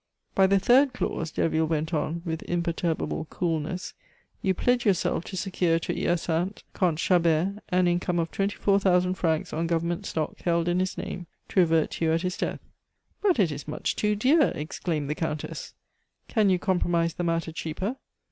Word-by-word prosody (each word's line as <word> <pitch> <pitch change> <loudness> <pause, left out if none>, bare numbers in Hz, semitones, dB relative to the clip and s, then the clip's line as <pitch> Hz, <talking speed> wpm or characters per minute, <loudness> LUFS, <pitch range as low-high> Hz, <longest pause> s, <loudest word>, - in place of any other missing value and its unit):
"By 190 0 +5
the 195 +1 +4
third 250 +7 +4
clause," 165 -9 -2
Derville 160 0 +1
went 160 +1 -1
on, 165 +2 -1
with 160 -1 -3
imperturbable 170 -2 -1
coolness, 165 +2 -3 0.5
"you 190 -1 +1
pledge 245 +4 +2
yourself 185 -5 +1
to 190 - -6
secure 180 -3 +1
to 165 - -3
Hyacinthe 175 +3 -1
Comte 175 -5 +1
Chabert 175 +3 +2
an 180 0 +3
income 175 0 0
of 165 -1 -1
twenty 200 +1 -1
four 200 -1 +3
thousand 180 -1 +3
francs 160 -4 -1
on 165 +1 -1
government 170 +1 -1
stock 155 -2 -3
held 170 -1 +1
in 175 +1 +2
his 185 0 -1
name, 180 -2 -5 0.2
to - - +1
revert 165 -3 +3
to 165 - -2
you 160 - +3
at 165 +2 0
his 180 +1 -1
death - - -3 0.3
" - - -46
"But 395 -4 +3
it 185 -8 +3
is 145 0 -6
much 150 - -2
too 210 0 +1
dear!" 275 +8 +4
exclaimed 155 0 -3
the 150 - 0
Countess. 155 -1 -4 0.5
"Can 215 -4 +3
you 185 - +4
compromise 175 -3 +1
the 175 - -3
matter 165 -1 0
cheaper?" 170 - -4
175 Hz, 185 wpm, -27 LUFS, 165-190 Hz, 0.5 s, By